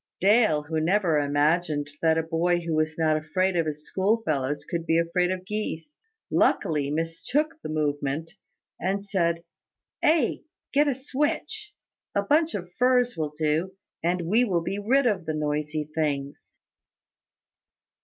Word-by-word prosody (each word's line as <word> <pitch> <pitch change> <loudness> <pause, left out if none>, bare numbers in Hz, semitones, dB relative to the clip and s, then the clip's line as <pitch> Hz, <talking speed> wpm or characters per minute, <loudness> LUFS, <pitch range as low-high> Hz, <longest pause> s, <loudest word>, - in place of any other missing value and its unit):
Dale, 200 -6 +4
who 160 +1 -2
never 170 -1 +2
imagined 145 +1 +1
that 160 -1 +3
a 160 - +1
boy 175 +2 +1
who 165 -1 -3
was 155 0 0
not 155 -1 +2
afraid 180 +5 0
of 165 -2 +1
his 150 0 -5
schoolfellows 155 - 0
could 170 -1 -4
be 165 - +3
afraid 170 +2 +1
of 185 0 -3
geese, 210 - -5 0.3
luckily 145 -3 +2
mistook 165 - -1
the - - -6
movement, 150 +1 -1 0.5
and 195 +2 -1
said, 170 -4 0 0.6
"Ay, 315 +1 +2 0.3
get 295 +2 +4
a 280 - +1
switch, 300 - -3 0.4
a 200 - +2
bunch 310 +8 +2
of 180 -3 -6
furze 250 -1 +3
will 150 -2 -3
do, 160 +5 0 0.3
and 175 +1 +1
we 215 +9 +3
will 180 -8 0
be 195 +4 -3
rid 260 +7 +2
of 195 -8 0
the 155 - -1
noisy 150 0 -2
things." 145 -3 -3
170 Hz, 145 wpm, -26 LUFS, 155-205 Hz, 0.6 s, Dale